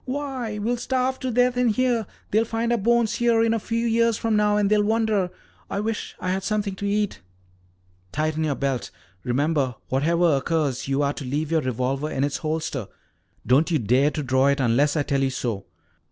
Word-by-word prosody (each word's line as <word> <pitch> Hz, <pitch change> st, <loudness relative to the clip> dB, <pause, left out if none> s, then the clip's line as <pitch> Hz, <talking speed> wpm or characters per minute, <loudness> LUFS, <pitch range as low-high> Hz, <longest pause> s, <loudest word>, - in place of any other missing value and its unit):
"Why, 260 Hz, -5 st, -3 dB
we'll 230 Hz, +4 st, -1 dB
starve 255 Hz, +1 st, -1 dB
to 260 Hz, -, -3 dB
death 245 Hz, +1 st, +2 dB
in 250 Hz, 0 st, +3 dB
here. 235 Hz, -1 st, +1 dB, 0.2 s
They'll 220 Hz, +2 st, +3 dB
find 230 Hz, +1 st, -2 dB
our 240 Hz, -, +3 dB
bones 235 Hz, +1 st, +2 dB
here 235 Hz, -1 st, +3 dB
a 230 Hz, 0 st, +2 dB
few 230 Hz, +2 st, -2 dB
years 230 Hz, -1 st, +2 dB
from 225 Hz, -1 st, 0 dB
now 210 Hz, 0 st, +3 dB
and 205 Hz, -1 st, +2 dB
they'll 210 Hz, +1 st, +3 dB
wonder 215 Hz, -3 st, +1 dB, 0.4 s
I -, -, -2 dB
wish 220 Hz, +1 st, -3 dB
I 185 Hz, -, -2 dB
had 190 Hz, +1 st, -1 dB
something 205 Hz, 0 st, -1 dB
to 200 Hz, -, -3 dB
eat." 205 Hz, 0 st, 0 dB, 0.9 s
"Tighten 155 Hz, +3 st, -1 dB
your 150 Hz, -3 st, 0 dB
belt. 135 Hz, -5 st, -2 dB, 0.3 s
Remember, 135 Hz, 0 st, 0 dB
whatever 165 Hz, +4 st, +2 dB
occurs, 140 Hz, -3 st, -1 dB
you 135 Hz, +1 st, +1 dB
are 140 Hz, 0 st, +1 dB
to -, -, -7 dB
leave 145 Hz, +4 st, -2 dB
your 160 Hz, -1 st, +3 dB
revolver 130 Hz, +3 st, -1 dB
in 135 Hz, -, -1 dB
its 145 Hz, 0 st, 0 dB
holster. 155 Hz, -, -3 dB, 0.6 s
Don't 140 Hz, +7 st, +3 dB
you 165 Hz, -, +2 dB
dare 130 Hz, +4 st, +3 dB
to 150 Hz, 0 st, -4 dB
draw 130 Hz, +1 st, +2 dB
it 140 Hz, +1 st, +2 dB
unless 135 Hz, +4 st, +2 dB
I 150 Hz, -, +1 dB
tell 140 Hz, -1 st, 0 dB
you 135 Hz, -, +2 dB
to. 115 Hz, -6 st, -3 dB
175 Hz, 195 wpm, -24 LUFS, 140-225 Hz, 0.9 s, in